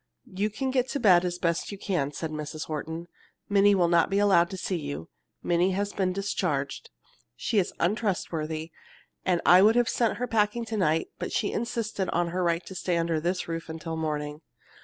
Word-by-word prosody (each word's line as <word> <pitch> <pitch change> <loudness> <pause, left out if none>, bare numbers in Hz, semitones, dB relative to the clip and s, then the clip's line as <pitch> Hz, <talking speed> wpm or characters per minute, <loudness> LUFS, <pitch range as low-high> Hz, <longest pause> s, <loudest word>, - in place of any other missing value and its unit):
"You 200 +3 0
can 260 +5 -2
get 255 -1 +1
to 285 - -2
bed 185 -7 +6
as 175 0 -2
best 170 +1 -1
you 200 - -6
can," 175 -8 -1
said 155 +2 -5
Mrs. 155 0 -5
Horton. 160 +2 -5 0.4
"Minnie 200 0 +5
will 175 -3 +3
not 170 -1 +3
be 195 - +1
allowed 190 -4 +4
to 190 - -6
see 185 0 -2
you. 145 - -6 0.3
Minnie 175 +2 +2
has 205 +2 -2
been 190 -2 0
discharged. 180 -7 -2 0.5
She 205 - +1
is 185 - 0
untrustworthy, 165 -5 -1 0.5
and 180 -2 +2
I 180 +1 +8
would 215 +3 +6
have 240 -1 +3
sent 230 -3 +1
her 250 - -1
packing 225 0 +1
to 220 -1 -3
night, 165 -4 +1
but - - -4
she 205 - 0
insisted 225 -4 -2
on 175 0 0
her 180 +2 -1
right 170 0 0
to - - -8
stay 180 -2 -1
under 165 -1 0
this 180 +3 -1
roof 165 -1 -5
until 160 0 -5
morning. 150 -1 -3
180 Hz, 200 wpm, -27 LUFS, 160-205 Hz, 0.5 s, I